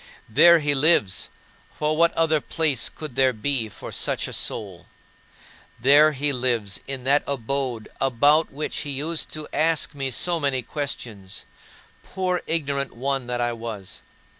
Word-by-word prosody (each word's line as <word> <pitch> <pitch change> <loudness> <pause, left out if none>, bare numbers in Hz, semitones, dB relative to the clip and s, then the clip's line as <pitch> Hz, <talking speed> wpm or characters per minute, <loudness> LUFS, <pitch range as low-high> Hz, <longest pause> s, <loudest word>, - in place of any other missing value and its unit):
There 170 +9 +6
he 145 -1 +1
lives; 135 - +2 0.5
for 150 +1 0
what 170 +1 +4
other 160 -2 +2
place 150 -6 -1
could 150 -6 -8
there 130 -1 +3
be 115 0 -1
for - - -9
such - - -1
a - - -7
soul? 95 -5 -4 0.9
There 145 +5 +6
he 145 +1 0
lives 120 -5 -1
in 135 -2 -4
that 140 +3 +4
abode 130 -3 -2
about 145 +5 +3
which 150 +3 -4
he 145 - -3
used 160 +3 -2
to 155 -1 -6
ask 160 0 +1
me 135 -2 -3
so 170 +6 0
many 140 -4 0
questions 115 -9 -5 0.6
poor 185 -1 -2
ignorant 140 -4 -1
one 135 +1 -2
that 120 0 -2
I 120 0 0
was. 115 -5 -7
140 Hz, 150 wpm, -24 LUFS, 120-155 Hz, 0.9 s, There